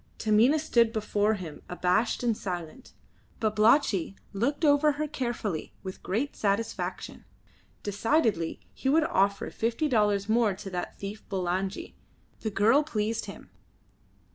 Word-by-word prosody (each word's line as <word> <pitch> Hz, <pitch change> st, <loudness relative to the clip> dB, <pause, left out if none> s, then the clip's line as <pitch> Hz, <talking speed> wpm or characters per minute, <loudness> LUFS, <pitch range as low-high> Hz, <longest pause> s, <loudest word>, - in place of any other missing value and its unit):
Taminah 225 Hz, +7 st, +4 dB
stood 235 Hz, -7 st, +3 dB
before 215 Hz, -1 st, +1 dB
him 165 Hz, -7 st, -8 dB
abashed 180 Hz, +7 st, +1 dB
and 235 Hz, -2 st, +2 dB
silent. 180 Hz, +6 st, -6 dB, 0.5 s
Babalatchi 215 Hz, -, +3 dB, 0.2 s
looked 265 Hz, +11 st, -1 dB
her 300 Hz, -, +6 dB
over 295 Hz, +1 st, +3 dB
carefully 235 Hz, -, -3 dB
with 190 Hz, -1 st, -7 dB
great 235 Hz, +10 st, -2 dB
satisfaction. 205 Hz, +2 st, -2 dB, 0.6 s
Decidedly 205 Hz, -, +1 dB
he 265 Hz, -, -2 dB
would 315 Hz, +3 st, +4 dB
offer 200 Hz, -, +1 dB
fifty 230 Hz, +7 st, -1 dB
dollars 210 Hz, -5 st, +2 dB
more 220 Hz, -3 st, +2 dB
to 195 Hz, 0 st, -8 dB
that 180 Hz, -1 st, -4 dB
thief 200 Hz, +2 st, -7 dB
Bulangi. 190 Hz, 0 st, -2 dB, 0.5 s
The 220 Hz, -, -2 dB
girl 215 Hz, +7 st, +4 dB
pleased 225 Hz, -7 st, -2 dB
him. -, -, -11 dB
215 Hz, 125 wpm, -28 LUFS, 195-245 Hz, 0.6 s, her